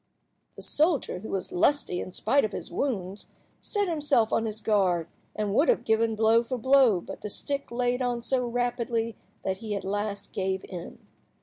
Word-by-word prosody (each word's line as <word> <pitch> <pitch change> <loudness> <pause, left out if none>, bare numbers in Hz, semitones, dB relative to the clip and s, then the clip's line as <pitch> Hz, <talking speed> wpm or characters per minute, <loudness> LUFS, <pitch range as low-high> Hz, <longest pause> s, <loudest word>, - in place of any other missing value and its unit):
The - - -8
soldier, 300 - +1
who 220 - -8
was 195 - -3
lusty 290 - +2
in - - -5
spite 270 +9 +2
of 215 - -2
his - - -5
wounds, 200 -7 -2 0.3
set 410 -2 -1
himself 295 -9 +2
on 225 - +2
his 215 0 -2
guard, 185 -7 +2 0.3
and 210 -2 -1
would 285 +9 +4
have - - +2
given 220 0 +2
blow 225 +2 +4
for 250 +2 -3
blow, 255 -6 +5
but - - -9
the 210 - -4
stick 280 +7 -3
laid 245 +1 0
on 245 -2 -1
so 250 -1 +1
rapidly 235 -2 -1 0.3
that 190 -1 -1
he 210 0 -4
at 200 - -4
last 205 +1 -3
gave 190 0 -1
in. 175 -2 -9
225 Hz, 185 wpm, -27 LUFS, 205-260 Hz, 0.3 s, blow